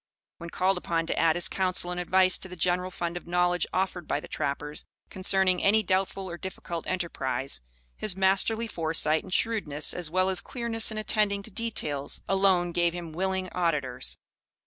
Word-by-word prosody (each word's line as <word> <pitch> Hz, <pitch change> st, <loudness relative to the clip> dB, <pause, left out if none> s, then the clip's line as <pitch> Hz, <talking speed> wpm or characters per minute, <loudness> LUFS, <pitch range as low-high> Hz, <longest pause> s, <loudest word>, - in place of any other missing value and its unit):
When 170 Hz, -, -7 dB
called 185 Hz, +2 st, +1 dB
upon 165 Hz, -2 st, -1 dB
to -, -, -2 dB
add 165 Hz, -1 st, +4 dB
his 175 Hz, -, 0 dB
counsel 185 Hz, -2 st, +1 dB
and 180 Hz, -, -3 dB
advice 185 Hz, +1 st, +4 dB
to -, -, -4 dB
the 180 Hz, -, -9 dB
general 180 Hz, +1 st, 0 dB
fund 175 Hz, -1 st, -4 dB
of 175 Hz, -, -9 dB
knowledge 180 Hz, 0 st, +2 dB
offered 185 Hz, -3 st, -1 dB
by -, -, 0 dB
the -, -, -10 dB
trappers 150 Hz, 0 st, -3 dB, 0.3 s
concerning 190 Hz, -1 st, +2 dB
any 215 Hz, +2 st, +4 dB
doubtful 190 Hz, 0 st, -1 dB
or 170 Hz, -1 st, -7 dB
difficult 175 Hz, -3 st, -6 dB
enterprise, 135 Hz, -, -2 dB, 0.3 s
his 190 Hz, -, -2 dB
masterly 195 Hz, +4 st, +2 dB
foresight 160 Hz, -5 st, +1 dB
and -, -, -12 dB
shrewdness, 180 Hz, -9 st, +1 dB
as 175 Hz, -3 st, -4 dB
well 185 Hz, +3 st, +2 dB
as 185 Hz, -1 st, +2 dB
clearness 235 Hz, -2 st, 0 dB
in 220 Hz, -, -4 dB
attending 210 Hz, -2 st, +1 dB
to 220 Hz, -, -10 dB
details, 150 Hz, -11 st, -1 dB
alone 190 Hz, -3 st, +3 dB
gave 170 Hz, 0 st, +1 dB
him 170 Hz, -2 st, -6 dB
willing 190 Hz, +2 st, -1 dB
auditors. 135 Hz, -, -1 dB
180 Hz, 175 wpm, -28 LUFS, 170-190 Hz, 0.3 s, add